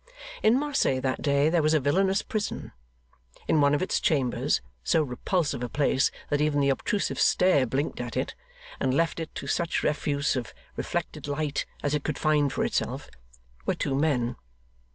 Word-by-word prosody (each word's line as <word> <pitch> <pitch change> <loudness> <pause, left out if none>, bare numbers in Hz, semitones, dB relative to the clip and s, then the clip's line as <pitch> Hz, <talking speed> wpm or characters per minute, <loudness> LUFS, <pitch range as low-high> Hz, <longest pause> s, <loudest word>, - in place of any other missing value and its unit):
In 220 +3 +5
Marseilles 275 - +1
that 130 -1 -1
day 140 0 +3
there 165 +1 +3
was 155 +1 +3
a - - +4
villainous 190 +8 +2
prison. 210 -2 -3 0.8
In 155 - +3
one 145 0 +4
of 145 - 0
its 185 - 0
chambers, 135 -6 +1 0.2
so 160 - +3
repulsive 145 +1 -1
a 125 - -3
place 140 -1 +2 0.2
that 145 0 +2
even 150 -1 +2
the 140 -1 +3
obtrusive 200 +9 -1
stare 165 -8 +4
blinked 135 +2 -2
at 120 -2 -5
it, - - -1 0.5
and 130 -1 +1
left 165 +2 +1
it 160 - -4
to - - -5
such 170 -1 0
refuse 145 -1 0
of 125 -4 -4 0.2
reflected - - -3
light 145 0 -2 0.2
as 145 0 0
it 150 -1 0
could 155 - -2
find 150 -2 +2
for - - 0
itself, - - -2 0.6
were - - +2
two 135 - -2
men. 135 -4 +1
145 Hz, 175 wpm, -27 LUFS, 135-160 Hz, 0.8 s, In